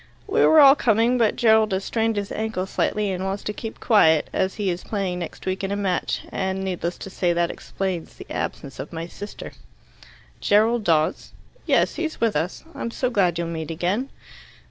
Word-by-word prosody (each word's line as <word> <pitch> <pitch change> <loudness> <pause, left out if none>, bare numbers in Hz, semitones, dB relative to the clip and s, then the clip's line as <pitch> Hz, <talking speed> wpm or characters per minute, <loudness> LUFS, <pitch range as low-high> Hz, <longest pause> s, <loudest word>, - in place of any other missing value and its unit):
"We 440 +2 +2
were 315 - +7
all 275 -2 +9
coming, 240 -1 +2
but 225 -3 +3
Gerald 220 -2 +4
has 190 +1 -1
strained 225 -1 0
his 200 -1 -3
ankle 220 -4 -2
slightly, 205 +1 -1
and 185 0 -3
wants 195 +1 -3
to 210 - -3
keep 225 +1 -7
quiet, 160 -9 +4
as 190 - 0
he 200 -3 0
is 175 +1 -5
playing 190 -4 -2
next 170 - -7
week 190 +1 -2
in 195 - -2
a - - 0
match. 195 -3 -1
And, 190 0 -2
needless 175 -2 -3
to 195 - -8
say, 175 -2 +1
that 170 0 +1
explains 185 -4 -4
the - - -10
absence 135 -2 -4
of 135 - -6
my 165 -1 -5
sister." 205 +4 -8 0.9
"Gerald 220 +3 +3
Dawes?" 155 -2 +1 0.3
"Yes; - - +2
he's 320 -2 -3
with 230 -5 +1
us. 160 +5 -2
I'm 235 - -4
so 250 +2 -2
glad 180 -7 +2
you'll 170 -1 -2
meet 160 -2 -5
again." 180 +11 -1
195 Hz, 195 wpm, -23 LUFS, 175-220 Hz, 0.9 s, all